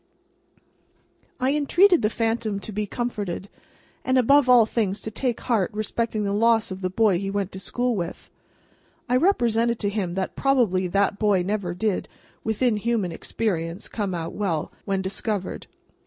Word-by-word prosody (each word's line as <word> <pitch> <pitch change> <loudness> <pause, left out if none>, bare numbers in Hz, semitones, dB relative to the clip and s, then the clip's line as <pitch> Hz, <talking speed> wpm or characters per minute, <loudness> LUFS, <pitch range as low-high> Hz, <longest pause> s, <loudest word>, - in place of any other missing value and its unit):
I 260 +2 +2
entreated 350 +5 +4
the 210 - +2
phantom 225 -2 -1
to 215 - -7
be 210 0 -2
comforted, 205 -5 -4 0.5
and 260 0 +2
above 265 +2 +5
all 245 -3 +7
things 215 -3 -1
to 220 - -5
take 240 +1 -2
heart 220 -7 +1
respecting 215 0 -2
the 200 0 -1
loss 225 0 +3
of 190 0 -6
the 185 - -1
boy 200 -2 +2
he 195 0 -3
went 200 -1 -2
to 190 - -7
school 245 +4 -1
with. 175 -3 -5 0.8
I 250 - +2
represented 235 - +2
to 205 - -1
him 195 -4 -2
that 190 -1 -3
probably 230 -10 +2
that 200 +2 +1
boy 205 -4 +3
never 190 -2 -2
did, 200 0 -1 0.3
within 220 +1 +1
human 215 -4 0
experience, 170 -1 -3
come 200 -5 -3
out 165 -1 -4
well, 175 -7 -2
when 195 -1 -1
discovered. 195 0 -3
210 Hz, 160 wpm, -24 LUFS, 190-235 Hz, 0.8 s, all